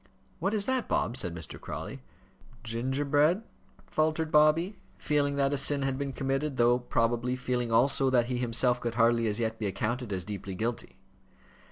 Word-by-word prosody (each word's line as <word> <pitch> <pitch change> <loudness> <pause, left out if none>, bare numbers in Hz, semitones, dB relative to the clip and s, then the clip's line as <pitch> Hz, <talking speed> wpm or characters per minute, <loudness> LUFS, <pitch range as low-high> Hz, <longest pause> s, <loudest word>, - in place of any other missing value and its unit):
"What 195 +5 0
is 205 -2 +1
that, 260 -3 0
Bob?" 115 - 0
said 90 -10 -1
Mr. 80 -5 -8
Crawley. 80 - -6 0.6
"Gingerbread," 140 - +1 0.4
faltered 155 0 0
Bobby, 160 +6 +3 0.2
feeling 145 -1 0
that 140 0 +1
a - - +1
sin 140 +1 +3
had 135 0 -1
been 140 -1 -2
committed, 135 +2 -2
though, 120 +1 +4
probably, 120 0 0
feeling 125 -2 -2
also 135 +3 +3
that 125 -2 +3
he 125 0 -2
himself 125 0 +2
could 120 -1 -3
hardly 115 0 +3
as 105 +1 -1
yet 110 -1 -2
be 105 - -1
accounted 120 +4 -3
as 90 -2 -2
deeply 100 -2 -6
guilty. 115 +4 -4
125 Hz, 170 wpm, -29 LUFS, 115-145 Hz, 0.6 s, though